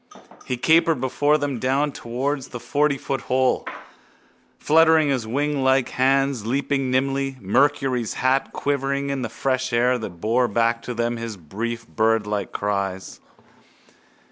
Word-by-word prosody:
_ - - -18 0.3
He 125 - -2
capered 160 +2 +3
before 145 +4 +2
them 145 -4 -3
down 135 +4 +1
towards 130 +3 -3
the 120 - -7
fortyfoot 140 +1 -1
hole, 130 0 +1 0.9
fluttering 160 -1 +4
his 125 -5 -1
winglike 135 0 +1
hands, 135 -2 +1
leaping 135 +3 -1
nimbly, 135 +1 0
Mercury's 130 +1 +1
hat 130 +1 +1
quivering 140 0 -1
in 135 -1 -2
the 115 - -3
fresh 130 +3 -1
wind 120 +1 +2
that 90 -6 -7
bore 120 +6 +2
back 115 +1 +1
to 125 - -4
them 120 0 -1
his 115 -2 -6
brief 115 +8 -5
birdsweet 105 -3 0
cries. 100 -2 -3
130 Hz, 135 wpm, -23 LUFS, 115-140 Hz, 0.9 s, fluttering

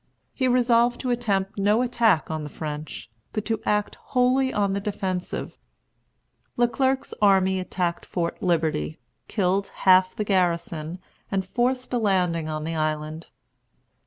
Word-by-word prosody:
He 260 - 0
resolved 240 -1 +3
to 255 - -1
attempt 205 -4 -1
no 210 +4 +3
attack 230 -10 +2
on 155 -1 -3
the 150 - -6
French, 150 -5 -6 0.2
but 215 - -2
to 225 -1 -1
act 210 0 0
wholly 260 +1 +2
on 200 -2 +1
the 200 - 0
defensive. 190 -3 -4 1.0
Le 240 0 +4
Clerc's 265 +2 0
army 190 -2 +4
attacked 180 -2 -2
Fort 170 -2 -3
Liberty, 160 -3 0 0.3
killed 195 -1 0 0.2
half 185 0 +6
the 210 - -1
garrison, 170 -4 0 0.3
and 195 -1 -1
forced 250 +5 -1
a 245 - +2
landing 180 -6 +1
on 155 0 -3
the 165 +1 -3
island. 155 +1 -2
195 Hz, 140 wpm, -25 LUFS, 170-235 Hz, 1.0 s, half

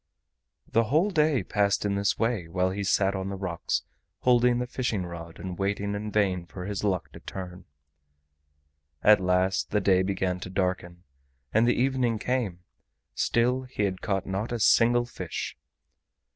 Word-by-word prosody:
The 115 +1 +2
whole 160 - +2
day 155 -5 +2
passed 100 -1 +1
in 100 - +1
this 100 0 +1
way, 115 -7 0
while 90 +2 0
he 100 +1 -3
sat 100 0 +2
on 95 0 -3
the 100 - -4
rocks 90 -3 -2 0.4
holding 125 -1 +4
the 125 - -1
fishing 120 -6 -2
rod 85 -1 -8
and 90 -1 -6
waiting 100 +1 -1
in 105 +1 -4
vain 95 -4 +1
for 90 +1 -8
his 100 0 -4
luck 95 -6 -1
to - - -11
turn. 90 -1 -8 1.4
At 105 -1 +7
last 90 +1 +1
the 105 - +2
day 95 -1 +3
began 95 -1 -1
to 90 - -7
darken, 90 -2 -2 0.5
and 110 +2 +4
the 120 - +2
evening 125 -3 +1
came; 110 -8 -2 0.5
still 125 +2 +1
he 125 -5 -4
had 95 -2 -1
caught 95 -3 -1
not 100 +5 -3
a 120 - -2
single 120 +3 +4
fish. 120 - -5
100 Hz, 165 wpm, -27 LUFS, 95-120 Hz, 1.4 s, At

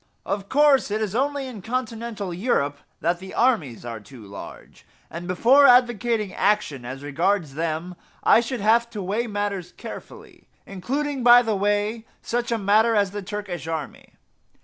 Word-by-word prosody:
Of 200 0 -3
course 285 -3 +4
it 210 +1 -1
is 215 -3 -2
only 280 +3 -1
in 245 -6 -8
continental 225 -4 -4
Europe 170 - 0 0.2
that 170 +1 0
the 190 +1 -9
armies 175 - +1
are 115 -2 -5
too 110 +2 -14
large; 100 0 -11 0.3
and 170 +1 -7
before 250 +10 +5
advocating 240 -4 +3
action 195 -12 0
as 130 +3 -7
regards 160 +2 0
them 165 +3 -3 0.3
I - - +6
should 240 -1 -4
have 230 +3 +3
to 210 -4 -6
weigh 210 +6 -1
matters 205 -4 -3
carefully 435 -7 -11 0.2
including 270 +8 -3
by 245 0 +8
the 220 -2 0
way 205 +3 -1 0.2
such 240 0 -2
a 230 - +1
matter 215 +3 +3
as 200 -2 +2
the 205 0 -5
Turkish 195 -4 -6
army. 160 -3 -6
205 Hz, 160 wpm, -23 LUFS, 175-240 Hz, 0.3 s, by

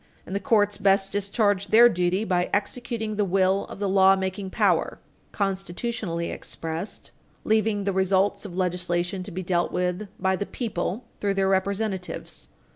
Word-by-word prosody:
And 190 - -5
the - - +1
courts 205 -5 +2
best 195 0 +3
discharge 205 0 +1
their 230 +3 +8
duty 180 -1 +1
by 180 -4 0
executing 220 0 -3
the 210 - +2
will 190 0 +2
of - - -10
the 200 0 -1
lawmaking 190 0 +3
power, - - +1 0.3
constitutionally 195 -2 -2
expressed, 165 +4 -6 0.3
leaving 215 -1 +1
the 195 0 0
results 190 +1 +2
of 185 -4 -6
legislation 180 0 -1
to 185 - -6
be 185 0 -5
dealt 175 -1 0
with 180 +3 -1
by 190 0 +2
the 200 +2 -4
people 220 -1 -3
through 200 -1 0
their 195 0 +2
representatives. 195 0 -2
195 Hz, 150 wpm, -25 LUFS, 185-205 Hz, 0.3 s, their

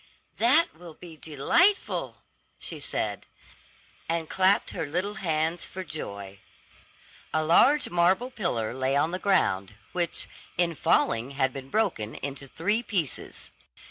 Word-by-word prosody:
"That 275 +9 +4
will 165 -1 -12
be 170 -3 -11
delightful," 160 - +1 0.3
she - - -7
said, - - -3 0.8
and 165 -1 -1
clapped 190 +4 +3
her 155 - -3
little 180 +7 -1
hands 165 0 0
for 185 - -6
joy. 100 - -7 0.9
A 155 - +1
large 255 - +5
marble 185 +9 +2
pillar 120 - -2
lay 130 +1 0
on 155 +4 +2
the 185 - -3
ground, 100 - +1 0.2
which, 175 -1 -1 0.3
in 170 -1 +2
falling, 115 -4 +2
had 135 -1 +2
been 135 -1 -8
broken 170 - 0
into 140 0 -5
three 205 - 0
pieces. 185 - -4
165 Hz, 130 wpm, -27 LUFS, 135-190 Hz, 0.9 s, large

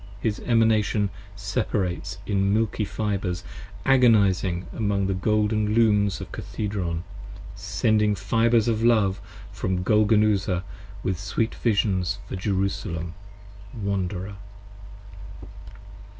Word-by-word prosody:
His 105 -2 -1
Emanation 110 -3 +2 0.2
separates 95 0 -2
in 100 -1 +1
milky 110 0 +1
fibres 100 -4 -2 0.4
agonizing 100 -8 +4
40 - - -10
Among 100 -3 0
the 95 - 0
golden 105 +2 +1
Looms 105 -4 +3
of - - -8
Cathedron, 90 -6 -3 0.5
sending 105 +2 +1
fibres 115 +4 +2
of 115 -1 +1
love 105 -5 +3 0.3
From 95 -1 -2
Golgonooza 105 -3 +3 0.4
with 95 -2 -1
sweet 105 +4 -1
visions 100 -4 0
for - - -5
Jerusalem, 95 -3 -2 0.7
wanderer. 100 -1 -3
100 Hz, 95 wpm, -25 LUFS, 95-110 Hz, 0.7 s, agonizing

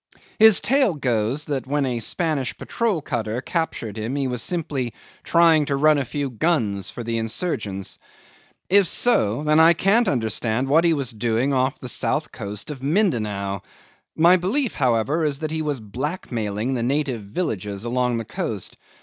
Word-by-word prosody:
'His 220 -2 +7
tale 265 - +2
goes 125 +1 0
that 135 -3 -3
when 145 0 0
a 125 -2 -1
Spanish 135 - -2
patrol 215 - -1
cutter 110 +1 -2
captured 130 - -3
him 115 +5 -3
he 140 -1 -1
was 125 -2 -3
simply 145 -8 -3 0.3
trying 165 -3 +4
to 140 - -1
run 150 +1 +4
a 135 - -2
few 140 +2 -3
guns 110 - 0
for 120 - -7
the 115 0 -2
insurgents. 110 - -3 0.7
If 200 0 +4
so, 125 - +2
then 155 +1 +3
I 165 +1 +7
can't 205 +8 +3
understand 115 0 0
what 160 +5 +4
he 170 - +4
was 135 -4 -1
doing 115 +4 0
off 130 +2 +1
the 125 - -8
south 150 +5 0
coast 105 +3 -6
of 135 -3 -8
Mindanao. 110 - 0 0.5
My 175 +3 +6
belief, 220 +8 0
however, 130 +4 +1
is 145 -3 0
that 155 +1 -4
he 160 0 -1
was 145 -4 -2
blackmailing 115 - -3
the 125 - -1
native 130 -1 -1
villages 100 - -4
along 125 0 0
the 115 - -4
coast. - - -4
135 Hz, 165 wpm, -23 LUFS, 115-160 Hz, 0.7 s, His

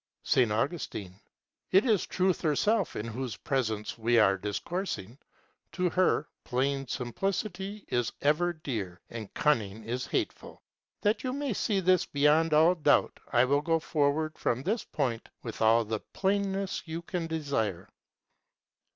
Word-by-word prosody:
S. 125 -4 +3
Augustine. 110 - -2 0.6
It 190 +5 +5
is 215 -6 +2
Truth 185 -1 +1
herself 195 +6 +1
in 105 - -3
whose 115 -1 -4
presence 110 -5 -2
we 120 +1 +3
are 100 -3 +5
discoursing. 115 - -4 0.5
To 180 -2 0
her, 185 0 +2 0.2
plain 135 +2 -1
simplicity 195 - -3
is 120 -1 0
ever 155 +5 +2
dear, 110 - -5
and 110 -3 -7
cunning 110 -9 +1
is 120 +3 -3
hateful. - - -3 0.4
That 210 +2 +1
you 255 -1 -1
may 280 -3 -2
see 200 0 0
this 185 -1 +3
beyond 150 +3 +3
all 160 +3 +6
doubt 150 -4 +2
I 120 +1 +5
will 140 +2 +2
go 165 +1 +2
forward 155 0 0
from 120 +3 0
this 215 +7 0
point 120 -6 -2
with 115 -2 -6
all 115 +1 +5
the 110 0 -2
plainness 195 - -1
you 165 +1 -5
can 175 -1 -3
desire. 140 - -2
145 Hz, 140 wpm, -29 LUFS, 115-180 Hz, 0.6 s, all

